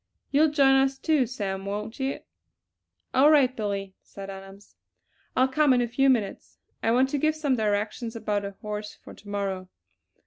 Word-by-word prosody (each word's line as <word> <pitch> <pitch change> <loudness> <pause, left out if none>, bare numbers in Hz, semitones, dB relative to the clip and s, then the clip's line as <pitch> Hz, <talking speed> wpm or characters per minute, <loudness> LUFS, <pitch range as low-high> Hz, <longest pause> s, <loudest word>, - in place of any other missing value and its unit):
You'll 305 +3 +4
join 280 -2 +4
us, 270 0 +2
too, 295 -4 +1
Sam, 195 -6 -4
won't 210 +4 -5
you?" 270 0 -2 0.9
"All 275 +3 +6
right, 270 -4 +4
Billy," 200 -3 -3
said 195 0 -9
Adams, 195 +1 -12 0.6
"I'll 255 +1 +4
come 285 +1 +3
in 245 - +3
a - - -1
few 270 +4 +2
minutes. 220 -7 -1 0.2
I - - +1
want 255 +3 +3
to 285 - -1
give 310 +2 +1
some 290 -4 0
directions 215 +2 -2
about 210 -2 -2
a 200 0 -6
horse 210 0 -5
for - - -14
to 205 - -15
morrow." 195 -2 -3
230 Hz, 175 wpm, -26 LUFS, 205-270 Hz, 0.9 s, All